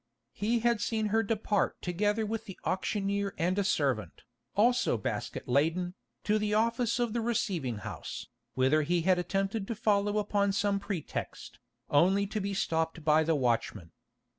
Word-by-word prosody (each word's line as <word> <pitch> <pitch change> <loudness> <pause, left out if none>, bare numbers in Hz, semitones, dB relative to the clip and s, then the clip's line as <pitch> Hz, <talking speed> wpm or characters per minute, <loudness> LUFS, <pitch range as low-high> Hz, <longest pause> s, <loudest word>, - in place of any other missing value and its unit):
He 230 +3 0
had 235 -2 +2
seen 220 0 0
her 225 - +4
depart 210 -2 0
together 205 +5 0
with 220 +1 -3
the 195 - -9
auctioneer 200 +1 -1
and 180 +4 +1
a - - +2
servant, 130 - -1 0.3
also 240 - +3
basket 105 - -4
laden, 165 +7 +1 0.3
to 215 +1 +2
the 210 0 0
office 230 +1 +1
of 240 -3 0
the 235 - 0
receiving 180 - -1
house, - - -6 0.3
whither 135 +4 +3
he 170 +3 +1
had 185 0 +3
attempted 195 +3 -1
to 230 - -3
follow 205 -1 +1
upon 200 -1 +1
some 200 0 +1
pretext, 195 - -5 0.3
only 190 +7 +4
to 205 +1 -3
be 200 0 -2
stopped 160 -3 -1
by 155 0 +5
the 160 0 +2
watchman. 115 - -1
200 Hz, 160 wpm, -30 LUFS, 165-215 Hz, 0.3 s, by